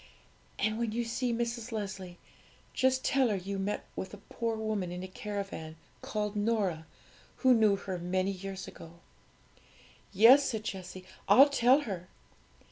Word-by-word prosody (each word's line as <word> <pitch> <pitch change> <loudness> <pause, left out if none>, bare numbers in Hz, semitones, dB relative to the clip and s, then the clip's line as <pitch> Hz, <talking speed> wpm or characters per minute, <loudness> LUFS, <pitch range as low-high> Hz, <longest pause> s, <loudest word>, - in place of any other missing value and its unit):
And 215 +1 0
when 230 -2 -1
you 240 +1 0
see 240 +2 -1
Mrs. 235 0 -3
Leslie, 190 -4 -5 0.6
just 260 0 +1
tell 265 -3 +3
her 210 - +1
you 195 +1 -4
met 200 +2 -2
with 190 +2 -5
a 200 - -21
poor 230 -1 -1
woman 215 -5 -2
in 180 +1 -5
a - - -5
caravan, 195 -5 -6 0.3
called 210 -1 -3
Norah, 205 -7 0 0.6
who 260 - +8
knew 215 -4 +4
her 190 -2 -5
many 185 +2 0
years 190 0 -6
ago.' 165 +1 -12 1.1
'Yes,' 240 +8 +7
said 220 -2 -3
Jessie; 185 -3 -6 0.2
'I'll 275 +3 +8
tell 265 +1 +4
her.' 190 -9 -5
210 Hz, 150 wpm, -31 LUFS, 190-230 Hz, 1.1 s, who